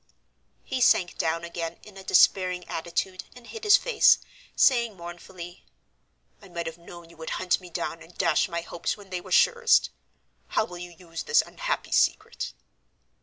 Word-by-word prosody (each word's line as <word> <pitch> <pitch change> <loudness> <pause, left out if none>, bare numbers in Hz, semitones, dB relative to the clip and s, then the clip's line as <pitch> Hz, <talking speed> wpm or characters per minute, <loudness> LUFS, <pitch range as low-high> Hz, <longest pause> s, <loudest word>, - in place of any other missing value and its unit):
He 255 - -3
sank 180 -6 +3
down 165 +1 0
again 170 -1 -5
in 210 -2 -14
a 195 - -10
despairing 180 -2 +3
attitude 175 +3 -3
and 245 -1 -14
hid 450 - -9
his 415 -1 +7
face, 480 -3 +5 0.4
saying 235 -6 +3
mournfully, 175 +1 -10 0.8
"I 200 - -14
might 170 -1 -4
have 165 +1 -6
known 170 0 -13
you 170 - -18
would 160 0 -7
hunt 185 0 +1
me 180 - -11
down 165 0 -4
and 175 - -16
dash 175 0 +2
my 170 -1 -3
hopes 170 +3 -4
when 200 -2 -15
they 180 -1 -3
were - - -13
surest. 475 -1 +4 0.6
How - - +1
will 175 -4 -9
you 175 0 -7
use 170 -1 -8
this 465 - +3
unhappy - - -4
secret?" - - +1
180 Hz, 170 wpm, -26 LUFS, 170-210 Hz, 0.8 s, his